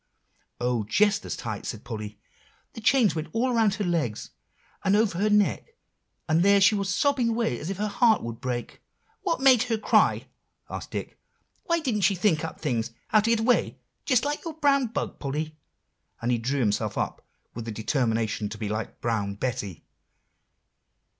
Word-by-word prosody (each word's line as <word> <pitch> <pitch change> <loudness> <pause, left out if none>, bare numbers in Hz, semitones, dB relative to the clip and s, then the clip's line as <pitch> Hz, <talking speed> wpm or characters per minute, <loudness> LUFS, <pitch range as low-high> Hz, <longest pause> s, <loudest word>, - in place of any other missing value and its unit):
"Oh! 120 -2 0
just 205 - +2
as - - -3
tight," 110 -3 -5
said 110 - -5
Polly; 105 -3 -7 0.5
"the 225 - -8
chain 240 -2 +4
went 155 0 -3
all 245 +3 +1
around 220 -4 +3
her 210 - -2
leg, 165 - 0 0.7
and 195 - +3
over 210 -5 +2
her 210 +2 +2
neck, 210 - +1 0.5
and 160 0 +3
there 200 +2 +5
she 195 +2 +6
was 200 -2 -1
sobbing 250 +4 +2
away 225 - 0
as 155 - -5
if 195 - -3
her 210 +1 -1
heart 220 +1 +3
would 115 -1 -6
break." 125 -2 -4 0.4
"What 340 -8 -1
made 260 -4 +6
her 225 - +1
cry?" 215 - +3 0.5
asked - - -6
Dick. - - -6 0.5
"Why 335 -2 +1
didn't 240 -8 -1
she 195 +1 +3
think 175 -4 +2
up 160 - -6
things, 120 -7 -1 0.2
how 215 - +5
to 215 +2 +1
get 230 -1 +3
away, 245 +2 +2 0.3
just 255 -3 +2
like 295 +1 -2
your 330 -2 -6
brown 280 -4 +3
bug, 225 - -4
Polly?" 155 +2 -3 0.6
and 120 +2 -1
he 120 - +1
drew 135 +4 -1
himself 105 -3 0
up - - -3 0.3
with 115 -1 -6
the 115 - -4
determination 110 -2 -1
to 105 - -7
be 105 -1 -4
like 110 +1 -4
Brown 105 -4 -1
Betty. 105 -7 -4
180 Hz, 180 wpm, -26 LUFS, -, 0.7 s, she